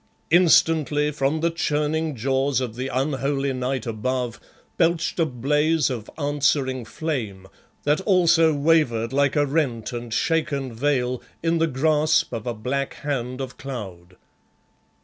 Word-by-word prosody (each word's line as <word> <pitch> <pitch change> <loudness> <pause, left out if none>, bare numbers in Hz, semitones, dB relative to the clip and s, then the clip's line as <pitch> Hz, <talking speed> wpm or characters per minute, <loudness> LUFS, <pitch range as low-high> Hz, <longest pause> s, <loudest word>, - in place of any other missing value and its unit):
Instantly 155 -4 +4
from 150 +2 -1
the 170 0 +1
churning 155 -1 -1
jaws 135 +2 0
of 125 -4 -3
the 130 +2 -3
unholy 135 +1 -1
night 130 -1 -2
above 120 +1 -2 0.4
belched 170 0 +1
a 165 - +3
blaze 150 +4 +1
of 115 -4 -5
answering 140 -4 0
flame, 115 - -4 0.4
that 150 +5 +2
also 170 -4 +4
wavered 140 -6 +2
like 140 +1 +2
a 145 -1 +3
rent 135 -6 -1
and 120 -1 -6
shaken 140 -2 0
veil 125 -1 0 0.2
in 165 0 +1
the 165 - +3
grasp 155 +1 +2
of 115 0 -5
a 120 - -1
black 130 +5 -3
hand 130 -3 -3
of 130 -2 -6
cloud. 95 -10 -8
140 Hz, 135 wpm, -23 LUFS, 125-155 Hz, 0.4 s, Instantly